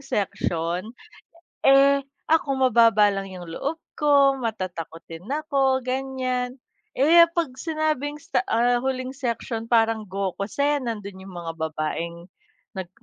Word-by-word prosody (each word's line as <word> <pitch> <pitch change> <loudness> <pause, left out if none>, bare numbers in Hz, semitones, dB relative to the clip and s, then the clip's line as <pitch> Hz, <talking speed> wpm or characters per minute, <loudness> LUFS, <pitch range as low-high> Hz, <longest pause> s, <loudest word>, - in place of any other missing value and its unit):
section. 180 -6 -2 0.7
Eh, 275 +1 +6 0.3
ako 320 -3 +3
mababa 230 -5 +5
lang 195 0 -4
yung 180 -2 -9
loob 285 - -3 0.2
ko, 280 -2 +3
matatakutin 180 -4 -6
ako, 275 -3 +1
ganiyan, 255 -1 -2 0.4
eh 335 +5 +7
'pag 325 -7 0
sinabing 310 -3 -1
sta, - - +1
ah, 240 +1 +2
huling 260 0 -2
section, 235 -3 -4
parang 225 -2 +2
Gokusen 210 +8 -1
nando'n 200 -4 -6
yung 180 - -10
mga 170 -1 -5
babaeng 160 +2 -3 0.5
nag 190 -3 -6
240 Hz, 115 wpm, -24 LUFS, 195-275 Hz, 0.7 s, eh